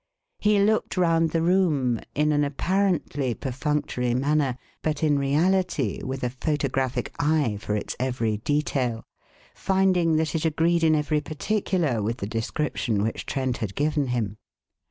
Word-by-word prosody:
He 210 0 +3
looked 215 0 +1
round 165 -2 +3
the 165 +1 0
room, 155 - +2 0.2
in 150 +1 +2
an 145 0 +2
apparently 145 - 0
perfunctory 130 -2 -1
manner, 140 -1 +1 0.2
but 155 -1 -2
in 145 -2 +3
reality 150 - +1
with 130 0 -4
a 125 - 0
photographic 130 -2 -1
eye 145 -8 +1
for 105 - -2
its 105 - -3
every 120 -4 0
detail, 130 -2 -1 0.5
finding 185 -4 +2
that 155 -1 0
it 160 - -1
agreed 165 +1 +2
in 160 -1 +5
every 150 0 +1
particular 160 - -1
with 115 +4 -2
the 100 - -4
description 115 -1 -1
which 110 - -3
Trent 130 -2 -1
had 105 -5 -4
given 145 -1 +1
him. 110 -4 -2
145 Hz, 145 wpm, -25 LUFS, 125-160 Hz, 0.5 s, in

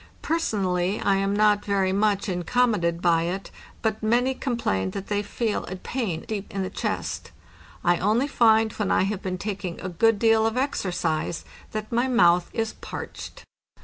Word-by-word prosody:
Person 315 -11 0
ally, 180 +2 0
1 - - -4
am 195 +1 0
not 210 0 +3
very 195 -2 +1
much 200 0 +1
incommoded 180 -2 +1
by 170 -2 +4
it, 190 +3 -4 0.3
but 220 -1 0
many 240 +4 +2
com 255 -2 -2
plain 95 - 0
that 195 - -7
they 205 -1 +1
feel 210 +1 -2
a 185 - -5
pain 190 -5 -3
deep 205 -2 -4
in 195 -1 -2
the 185 - -4
chest. - - -3 0.5
I 175 0 +3
only 220 +9 +2
find 225 -5 +4
when 210 -3 -2
I - - +3
have 195 0 -2
been 185 -2 -3
taking 190 -3 -4
a 185 - -4
good 225 +5 +3
deal 225 0 +4
of 225 +2 -2
exercise 175 - -1 0.3
that 215 0 -5
my 240 +2 +2
mouth 175 -8 +4
1s 225 -1 -2
parched." - - -8
205 Hz, 180 wpm, -25 LUFS, 185-225 Hz, 0.5 s, by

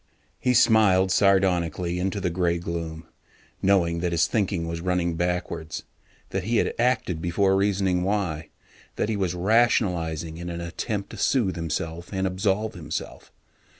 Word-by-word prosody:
He 125 -1 +2
smiled 100 -5 +5
sardonically 90 -3 +2
into 95 +2 -1
the 90 -2 -1
gray 85 -1 +1
gloom, 85 -1 -5 0.6
knowing 85 -4 +2
that 85 0 -1
his 80 -1 +3
thinking 90 -3 -1
was 85 0 -4
running 90 -1 0
backwards, 90 -2 -3 0.5
that 95 -1 -2
he 115 +2 +1
had - - +1
acted 115 -9 +1
before 95 +3 +2
reasoning 95 -2 +1
why, 90 -5 -1 0.5
that - - -1
he 110 - 0
was 95 -3 -1
rationalizing 90 -6 +1
in 85 +1 -6
an 85 0 -5
attempt 100 +4 -4
to - - -8
soothe 115 -9 +1
himself 85 +1 -4
and 95 -1 -1
absolve 95 +3 0
himself. 85 -6 -6
90 Hz, 150 wpm, -25 LUFS, 85-100 Hz, 0.6 s, smiled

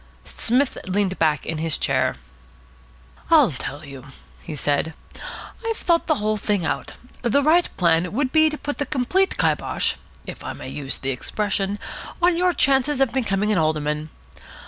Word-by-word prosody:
Psmith 255 +4 0
leaned 190 0 0
back 155 -3 +2
in 160 -1 -3
his 160 -1 +1
chair. - - +1 1.1
"I'll 300 - +6
tell 145 +2 -6
you," 140 -1 -10 0.3
he 155 - -7
said. 145 +3 0 0.7
"I've 455 -1 -1
thought 335 -1 +1
the 310 - +3
whole 215 -3 0
thing 205 -4 0
out. - - -2 0.3
The 260 +4 +2
right 335 +4 +4
plan 170 0 +3
would 260 +4 0
be 315 +1 +5
to 300 - -5
put 290 0 -4
the 285 - -1
complete 305 +9 +1
kybosh - - +1 0.3
(if - - -8
I - - -4
may - - -8
use 140 -2 -3
the 135 - -2
expression) 200 +8 -1 0.4
on 350 0 +4
your 360 +1 +3
chances 275 -2 +2
of 270 -4 +2
becoming 210 -5 +1
an 205 - +3
alderman. 155 -1 0
210 Hz, 165 wpm, -23 LUFS, -, 1.1 s, I'll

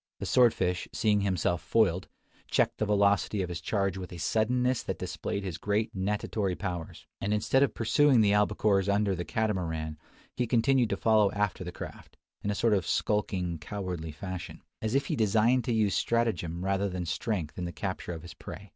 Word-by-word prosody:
The - - -5
sword 125 -2 +5
fish, 90 -3 -1
seeing 105 -2 +2
himself 90 -3 0
foiled, 95 -5 +2 0.4
checked - - +1
the 110 - 0
velocity 100 -1 +2
of 90 - -4
his 85 -1 -5
charge 95 +1 -1
with 90 -1 -7
a 90 - -7
suddenness 125 +7 +1
that - - -4
displayed 100 - -4
his 90 -4 -5
great 105 +3 -1
natatory 100 0 -1
powers; 85 -2 -5 0.2
and, 105 +2 +1
instead 120 +5 +2
of 140 - +2
pursuing 130 +2 +4
the 105 -2 +4
albacores 105 -1 +2
under 100 -1 +2
the 90 -1 -3
Catamaran, 80 -8 -2 0.4
he 125 -1 0
continued 120 +1 +3
to 100 - -1
follow 110 -2 +4
after 105 -2 -1
the 90 - -5
craft, - - -10 0.2
in 100 - -2
a 105 - 0
sort 115 +1 +2
of 95 -4 +1
skulking, 90 -5 0
cowardly 90 -2 -5
fashion, 90 +3 -7 0.2
as 110 +3 -1
if 140 - +2
he - - -1
designed 115 +3 +3
to - - 0
use 110 -3 +2
stratagem 90 -7 0
rather 100 +1 +1
than 90 -1 -4
strength 85 0 -3
in 90 - -2
the 85 - -4
capture 95 -1 -4
of 80 - -8
his 85 - -9
prey. 100 +1 -10
100 Hz, 190 wpm, -29 LUFS, 90-110 Hz, 0.4 s, sword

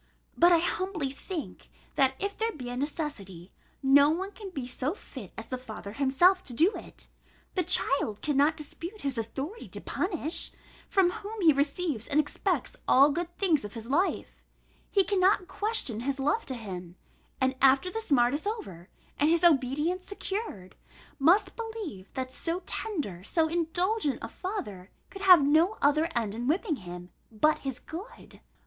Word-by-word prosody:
But 345 +1 +6
I 340 - +7
humbly 345 -3 -1
think, 315 +3 -7 0.2
that 265 -1 +3
if 400 +1 -3
there 450 +1 -1
be 255 - -7
a 245 - -4
necessity, 250 - -4 0.3
no 280 +2 +6
one 375 +5 -2
can 410 -2 -9
be 275 -9 -5
so 260 +6 -2
fit 245 - -11
as 225 - -5
the 255 - -5
father 220 -5 -8
himself 285 - +4
to 250 - -4
do 335 - +5
it. - - -9 0.5
The 370 - +1
child 275 - +2
cannot 295 +1 +2
dispute 335 +7 -8
his 270 -4 -2
authority 275 - -5
to - - -9
punish, 340 -3 -1 0.4
from 375 -2 +3
whom 425 +4 -7
he 320 -4 +6
receives 280 -3 -1
and 290 - +2
expects 305 -1 -1
all 275 +3 +7
the - - -2
good 345 +2 -4
things 335 - +2
of 205 - -7
his 230 +2 -6
life: 355 +7 0 0.5
he 395 - +3
cannot 380 -1 +2
question 410 - 0
his 270 +3 -2
love 295 +12 0
to 260 - -3
him, 180 -6 -7 0.4
and 260 0 +2
after 275 +7 +5
the 445 - -2
smart 250 - +3
is 305 +7 -2
over, 190 - -5 0.3
and 295 - +4
his 335 +1 +2
obedience 305 +3 +3
secured, 390 - -5 0.4
must 370 +7 +4
believe 440 - -6
that 260 -1 -3
so 335 +6 -3
tender, 285 - -4
so 320 - +1
indulgent 345 +1 0
a - - -3
father 210 - -6 0.2
could 390 0 -9
have 365 -6 +8
no 325 +8 +3
other 305 +3 +3
end 225 -4 0
in 240 +3 -4
whipping 320 - +1
him, 180 -2 -9 0.2
but 300 +8 +2
his 270 -3 -4
good. 355 - -10
300 Hz, 170 wpm, -28 LUFS, 255-370 Hz, 0.5 s, have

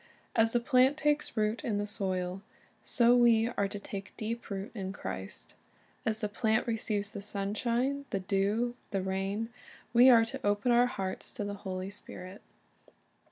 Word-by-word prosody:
As 225 0 +4
the 240 - +3
plant 255 +2 +4
takes 295 -4 0
root 215 +2 0
in 215 -4 0
the 205 - -1
soil, 190 -3 -2 0.4
so 240 0 +4
we 235 -2 +5
are 200 -4 0
to 205 - -6
take 195 -1 -8
deep 230 +2 -4
root 195 +1 -4
in 190 -4 -4
Christ. 95 - -7 0.5
As 220 0 0
the 210 - +1
plant 220 +2 +1
receives 215 -3 -1
the 205 -3 -6
sunshine, 235 +7 -1
the 195 - -1
dew, 195 +4 +1
and 245 0 -3
the 190 -2 -2
rain, 195 +4 -1 0.4
we 245 +2 +8
are 230 -2 +7
to 270 +4 -6
open 205 +4 +2
our 240 +1 +5
hearts 195 -6 -4
to - - -3
the 205 0 -3
Holy 190 -1 -5
Spirit. 190 -1 -9
210 Hz, 170 wpm, -31 LUFS, 195-235 Hz, 0.5 s, we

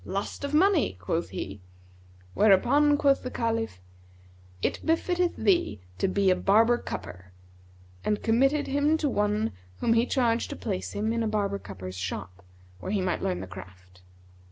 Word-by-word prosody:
'Lust 200 +7 -4
of 280 - -2
money,' 320 - +3
quoth 85 -1 -2
he; 95 +1 -6 0.7
whereupon 265 +9 +4
quoth 280 -2 +3
the 255 - -5
Caliph, 225 - -2 0.8
'It - - -1
befitteth 350 +2 +1
thee 350 - +1 0.2
to - - +2
be 190 0 +2
a - - +4
barber 225 +6 +4
cupper,'[FN#164] 90 +1 -7 0.8
and 210 -1 0
committed 270 +6 +3
him 290 +3 +2
to 310 - 0
one 210 - 0 0.3
whom 230 - +2
he 230 +2 +3
charged 235 -3 +1
to - - -5
place 95 +1 -4
him 220 +2 -1
in 230 - -1
a 225 - 0
barber 200 -2 -1
cupper's 95 - -8
shop, 90 0 -5 0.4
where 190 - -5
he 205 - +1
might 185 -1 -1
learn 90 0 -1
the - - -5
craft. 95 -1 -13
215 Hz, 160 wpm, -27 LUFS, -, 0.8 s, whereupon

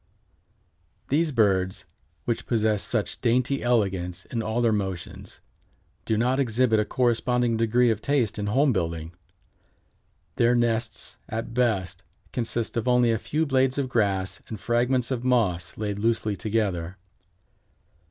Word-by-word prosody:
] 85 -4 -42
These 155 +3 +2
birds, 95 -5 +1 0.4
which 120 - -2
possess 110 -3 +1
such - - -2
dainty 130 +3 +1
elegance 95 -6 0
in 115 - -3
all 110 +1 -1
their 120 -2 +3
motions, 95 -5 -4 0.6
do 110 - 0
not 125 +4 +1
exhibit 120 -3 +2
a 105 - +1
corresponding 120 0 +1
degree 115 +2 +3
of 110 -1 -2
taste 125 -7 0
in 105 - -2
home 135 +5 +3
building. 85 -3 -3 1.2
Their 120 +1 +4
nests, 115 -1 -1
at 115 +1 -4
best, 110 -7 0 0.3
consist 115 -1 -2
of 115 - -1
only 125 -1 +4
a 110 - 0
few 155 +6 -1
blades 130 -2 +2
of 135 -2 -1
grass 100 -5 0
and 110 - -7
fragments 120 +3 +1
of 125 -2 -2
moss 100 -10 0
laid 105 -1 -3
loosely 110 -1 0
together. 95 -3 -2
115 Hz, 140 wpm, -25 LUFS, 100-125 Hz, 1.2 s, Their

